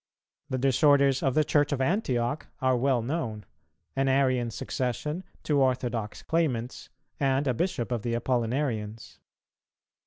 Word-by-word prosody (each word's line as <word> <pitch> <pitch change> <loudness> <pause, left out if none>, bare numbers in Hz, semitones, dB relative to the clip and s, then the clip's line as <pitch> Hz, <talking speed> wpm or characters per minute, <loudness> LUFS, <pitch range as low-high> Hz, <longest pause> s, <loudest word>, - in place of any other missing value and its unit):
The 130 - -1
disorders 135 +1 +4
of 135 -2 +1
the 155 - +4
Church 145 0 +2
of 140 - 0
Antioch 140 - 0
are 130 -1 +2
well 125 -1 +1
known: 115 -7 -3 0.5
an 135 0 +1
Arian 130 -3 +2
succession, 130 - -3 0.2
two 145 -2 +2
orthodox 120 -4 -1
claimants, 130 -8 -1 0.3
and 135 0 +2
a 130 - +2
bishop 170 -4 -2
of 120 -3 -1
the 115 +1 -1
Apollinarians. 115 -3 -2
130 Hz, 130 wpm, -28 LUFS, 120-145 Hz, 0.5 s, disorders